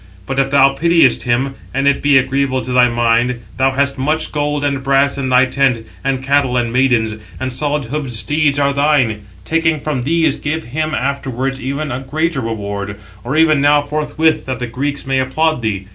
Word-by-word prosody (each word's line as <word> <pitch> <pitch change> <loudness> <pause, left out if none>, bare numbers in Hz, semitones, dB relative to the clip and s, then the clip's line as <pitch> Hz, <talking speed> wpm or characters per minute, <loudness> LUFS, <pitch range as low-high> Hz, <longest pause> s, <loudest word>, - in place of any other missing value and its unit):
But 135 +4 -2
if 135 0 +1
thou 135 0 +5
pitiest 165 -3 +3
him, 130 +3 0 0.2
and 135 +1 +1
it 140 - +2
be 145 -1 +4
agreeable 135 0 0
to 130 - -5
thy 125 -1 +5
mind, 120 +1 +1 0.2
thou 135 +1 +3
hast 140 0 0
much 155 +4 -1
gold 145 -1 -1
and 140 -2 -1
brass 135 +1 +2
in 135 -2 -3
thy 130 0 +5
tent, 130 -3 0 0.2
and 135 -1 -1
cattle 135 -2 +1
and 120 -1 -1
maidens, 125 -4 +2 0.3
and 130 -1 -3
solid 145 +2 -1
hoofed 140 +2 -4
steeds 145 +6 0
are 140 -1 +2
thine. 140 -7 +1 0.2
Taking 160 -1 +1
from 145 -3 -3
these, 160 +5 +1
give 160 +2 -3
him 155 +5 -3
afterwards 135 -1 -2
even 140 +4 -3
a 125 - -3
greater 155 +2 -2
reward, 100 -3 -4 0.3
or 135 +6 -2
even 155 -3 +4
now 145 0 +4
forthwith, 155 +2 0
that 130 -1 -2
the 125 - -4
Greeks 140 +5 -4
may 135 0 0
applaud 155 +3 0
thee. 100 -4 -2
135 Hz, 190 wpm, -16 LUFS, 125-145 Hz, 0.3 s, thou